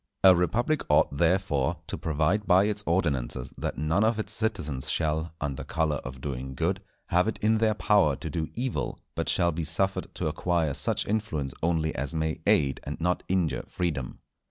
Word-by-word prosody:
A 95 -1 +9
republic 120 - +1
ought, 75 -1 +4
therefore, 85 -4 +1
to - - -4
provide 80 +7 0
by 95 +1 +6
its 105 0 0
ordinances 70 -7 0
that - - -4
none 80 +8 +1
of 110 0 +2
its 105 -1 -3
citizens 75 - -1
shall, 80 0 -1
under 70 -2 -3
colour 80 -2 0
of 65 -1 -8
doing 65 -1 -5
good, 90 +6 0 0.3
have 90 +4 +3
it 110 - -1
in 110 +1 +2
their 110 -1 +2
power 100 -9 +3
to 80 - -6
do 80 -1 -2
evil, 125 +1 -2
but - - -2
shall 85 0 +3
be 85 +1 -3
suffered 95 +4 0
to 90 - -3
acquire 80 -1 0
such 70 0 0
influence 100 -11 -2
only 80 -1 +1
as 70 +4 -2
may 80 0 -1
aid 70 -3 +3
and 75 - -5
not 90 +2 +1
injure 85 -8 +1
freedom. 75 -8 -3
80 Hz, 180 wpm, -27 LUFS, 75-95 Hz, 0.3 s, A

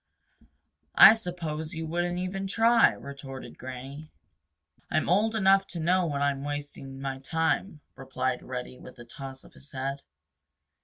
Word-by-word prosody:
"I - - +11
suppose 170 -6 -4
you 160 0 -4
wouldn't 175 +2 -1
even 190 +2 -3
try?" 225 +3 +5
retorted 140 -1 -9
Granny. 135 +4 -8 0.8
"I'm - - 0
old 215 +6 +2
enough 195 -2 +4
to 175 - -6
know 175 +2 +2
when 140 -2 -1
I'm 140 -1 0
wasting 145 -2 -6
my 135 -1 -4
time," 160 +3 -1
replied 130 -1 -2
Reddy 125 0 -6
with 125 - -13
a 120 - -11
toss 135 +2 -9
of - - -18
his 140 - -14
head. 135 +1 -3
145 Hz, 145 wpm, -28 LUFS, 135-180 Hz, 0.8 s, I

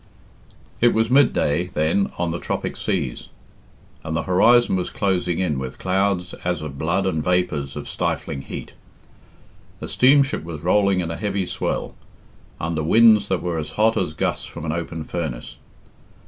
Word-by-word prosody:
XVIII. 120 - +5
It - - -1
was 110 0 +2
midday, 90 - +3
then, 85 +4 0
on 85 -1 -1
the 85 - -3
tropic - - -3
seas, 85 - -3 0.8
and 80 0 -2
the 80 - -1
horizon 120 +5 +4
was 90 -1 -2
closing 90 -3 0
in 80 -7 0
with 65 0 -6
clouds 95 -1 0
as 85 -3 -1
of 70 -3 -7
blood 90 +4 0
and 80 -5 0
vapours 75 -6 0
of - - -6
stifling 70 - -3
heat. - - -8 1.1
A - - -6
steamship 140 - +3
was 80 -2 -7
rolling 100 +1 +3
in 85 -1 -3
a 85 - -4
heavy 100 -2 -1
swell, - - -3 0.6
under 85 -1 -2
winds 110 +6 +5
that 95 - -1
were 85 -2 -1
as 75 - -6
hot 110 +1 +3
as 85 -4 -1
gusts - - -1
from - - -8
an 75 - -1
open 80 -1 -4
furnace. 75 -8 -5
90 Hz, 165 wpm, -22 LUFS, 80-100 Hz, 1.1 s, XVIII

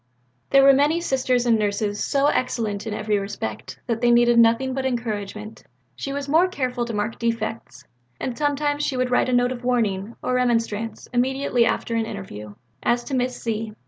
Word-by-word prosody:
There 275 0 +6
were 275 0 +8
many 295 +5 +3
Sisters 255 -6 0
and 230 -2 +3
Nurses 205 0 -1
so 280 0 +1
excellent 225 -7 -1
in 215 - -3
every 210 -1 0
respect 110 - -6
that 230 -2 -2
they 240 - +3
needed 240 0 +5
nothing 230 +3 +3
but 265 0 -2
encouragement; 215 -4 -4 0.3
she 275 - -5
was 280 0 -4
more 325 +6 +4
careful 255 -8 -2
to 235 - -5
mark 210 +2 -2
defects, 230 -1 -3 0.4
and 255 - -3
sometimes 290 +1 0
she 265 - -1
would 255 0 0
write 250 - +2
a - - 0
note 245 0 +3
of 250 -1 -6
warning 225 -4 0
or 255 - -1
remonstrance 230 -3 -1
immediately 250 -1 +2
after 230 - -1
an 225 -1 0
interview, 105 +2 -8 0.3
as 240 0 +1
to 275 - -7
Miss 250 -1 -1
Z. 220 -1 -3
240 Hz, 185 wpm, -23 LUFS, 220-260 Hz, 0.4 s, were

